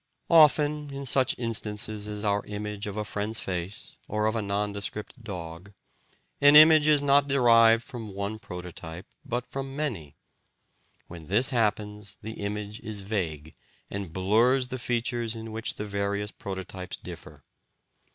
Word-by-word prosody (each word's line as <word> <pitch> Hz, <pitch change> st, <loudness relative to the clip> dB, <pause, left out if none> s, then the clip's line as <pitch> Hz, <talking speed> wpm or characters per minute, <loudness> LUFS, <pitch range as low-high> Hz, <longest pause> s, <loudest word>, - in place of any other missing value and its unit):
Often, 150 Hz, -2 st, +5 dB
in 140 Hz, 0 st, -6 dB
such 130 Hz, 0 st, +2 dB
instances 105 Hz, -2 st, -2 dB
as 105 Hz, 0 st, -5 dB
our 100 Hz, 0 st, +1 dB
image 105 Hz, 0 st, -5 dB
of 105 Hz, 0 st, -5 dB
a 105 Hz, -, -2 dB
friend's 105 Hz, +2 st, -2 dB
face 90 Hz, +2 st, -5 dB
or 105 Hz, 0 st, -1 dB
of 110 Hz, +1 st, +1 dB
a 115 Hz, -, 0 dB
nondescript 105 Hz, +3 st, -3 dB
dog, 90 Hz, -1 st, -7 dB, 0.7 s
an 145 Hz, +1 st, +7 dB
image 155 Hz, 0 st, +9 dB
is 150 Hz, -2 st, +4 dB
not 140 Hz, 0 st, +4 dB
derived 115 Hz, -4 st, +5 dB
from 115 Hz, -6 st, -8 dB
one 100 Hz, +2 st, -3 dB
prototype, 90 Hz, -3 st, -8 dB, 0.2 s
but 120 Hz, +1 st, -3 dB
from 135 Hz, 0 st, -6 dB
many; 105 Hz, -, -4 dB, 0.9 s
when 85 Hz, -3 st, -11 dB
this 115 Hz, +8 st, +2 dB
happens, 105 Hz, -3 st, -1 dB
the 110 Hz, +2 st, -5 dB
image 105 Hz, +1 st, -4 dB
is 105 Hz, -2 st, -5 dB
vague, 85 Hz, -7 st, -3 dB, 0.4 s
and 100 Hz, -4 st, -5 dB
blurs 115 Hz, +8 st, +2 dB
the 130 Hz, -, -4 dB
features 120 Hz, -1 st, -1 dB
in 110 Hz, 0 st, -7 dB
which 110 Hz, 0 st, -2 dB
the 105 Hz, -, -5 dB
various 100 Hz, 0 st, -2 dB
prototypes 95 Hz, -1 st, -6 dB
differ. -, -, -11 dB
105 Hz, 145 wpm, -27 LUFS, 100-120 Hz, 0.9 s, image